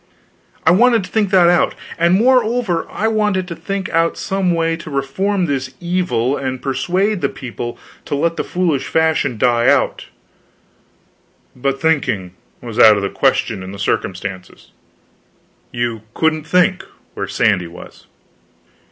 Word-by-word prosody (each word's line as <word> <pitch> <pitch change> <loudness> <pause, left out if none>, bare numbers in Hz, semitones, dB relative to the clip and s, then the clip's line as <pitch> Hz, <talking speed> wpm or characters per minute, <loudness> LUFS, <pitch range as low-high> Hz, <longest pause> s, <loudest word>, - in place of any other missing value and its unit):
I 160 - +6
wanted 230 +3 +4
to - - -10
think 215 -3 +1
that 185 -3 +5
out; 175 -1 +3 0.2
and 170 +2 +4
moreover 230 -5 +2
I 220 - -1
wanted 210 -4 0
to 170 - -5
think 195 +1 -4
out 165 0 +1
some 195 -2 -1
way 165 -1 +1
to 165 - -9
reform 175 +8 -1
this 130 -3 -3
evil 170 -8 0
and 130 -2 -3
persuade 175 +10 -1
the - - +1
people 120 -2 -7 0.3
to - - -2
let 165 +4 0
the - - -2
foolish 170 -7 -1
fashion 160 -7 +1
die 120 +1 +2
out; - - +2 1.5
but 135 +1 -2
thinking 110 - 0 0.3
was 115 -3 -6
out 110 -1 +8
of 100 - -2
the 100 - -1
question - - 0
in 95 +1 -8
the - - -8
circumstances. 95 -1 -4 1.0
You 120 -2 -2
couldn't 155 -1 0
think, 180 +2 +2 0.3
where - - -4
Sandy 100 -6 +1
was. 85 - -13
160 Hz, 145 wpm, -18 LUFS, 125-185 Hz, 1.5 s, out